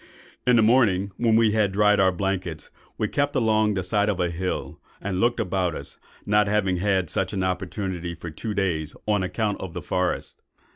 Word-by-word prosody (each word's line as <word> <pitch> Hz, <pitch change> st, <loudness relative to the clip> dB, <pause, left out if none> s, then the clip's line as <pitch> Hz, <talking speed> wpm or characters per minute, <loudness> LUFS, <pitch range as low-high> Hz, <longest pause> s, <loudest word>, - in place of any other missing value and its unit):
"In 125 Hz, -, +6 dB
the 115 Hz, -, +5 dB
morning, 105 Hz, -5 st, +3 dB
when 115 Hz, -2 st, +3 dB
we 115 Hz, -1 st, +4 dB
had 105 Hz, -2 st, +2 dB
dried 105 Hz, +1 st, +3 dB
our 95 Hz, -1 st, +5 dB
blankets, 90 Hz, -4 st, -3 dB, 0.3 s
we 105 Hz, -, 0 dB
kept 145 Hz, +5 st, -1 dB
along 110 Hz, -4 st, +2 dB
the 95 Hz, -, -1 dB
side 105 Hz, +2 st, +1 dB
of 100 Hz, -3 st, -1 dB
a 90 Hz, -1 st, 0 dB
hill, 90 Hz, +2 st, -4 dB, 0.2 s
and 95 Hz, -2 st, -3 dB
looked 120 Hz, +3 st, +2 dB
about 90 Hz, -2 st, 0 dB
us, -, -, -7 dB, 0.3 s
not 105 Hz, 0 st, +3 dB
having 100 Hz, -3 st, +1 dB
had 95 Hz, -1 st, +1 dB
such -, -, -1 dB
an 95 Hz, -2 st, -1 dB
opportunity 90 Hz, -1 st, -3 dB
for 85 Hz, +1 st, -8 dB
two 105 Hz, +7 st, -5 dB
days, 80 Hz, -6 st, -1 dB
on 105 Hz, -2 st, +1 dB
account 100 Hz, +3 st, -2 dB
of 95 Hz, -3 st, -6 dB
the -, -, -4 dB
forest. 90 Hz, -1 st, -2 dB
100 Hz, 195 wpm, -24 LUFS, 90-105 Hz, 0.3 s, In